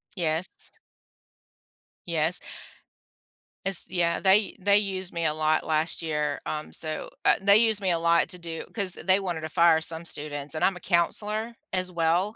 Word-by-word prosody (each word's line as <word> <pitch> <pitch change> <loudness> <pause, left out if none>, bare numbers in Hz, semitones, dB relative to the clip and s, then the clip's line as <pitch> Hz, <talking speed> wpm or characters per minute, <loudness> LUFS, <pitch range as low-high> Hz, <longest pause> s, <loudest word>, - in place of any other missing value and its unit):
Yes. 165 -1 +2 1.3
Yes. 165 +1 0 1.3
It's 195 -2 +4
Yeah, 170 -2 0
they 195 +2 +2
they 200 +2 +4
used 190 -3 -3
me 170 -1 -3
a 155 - +1
lot 155 0 0
last 160 +2 0
year, 150 -2 -2
um, 155 0 -5
so, 155 -1 -3
uh - - +5
they 200 +1 +6
used 220 -2 +3
me 185 -2 +1
a 165 - +1
lot 170 0 +3
to 180 - -5
do 165 -1 -6
'cause 200 -5 -1
they 190 +3 +1
wanted 175 -4 -4
to 155 - -5
fire 170 -1 +4
some 160 +1 -2
students 145 -1 -4
and 155 - 0
I'm 195 - +1
a - - -9
counselor 210 +6 -1 0.2
as 185 -1 -1
well. 175 +5 0
170 Hz, 170 wpm, -26 LUFS, 160-195 Hz, 1.3 s, they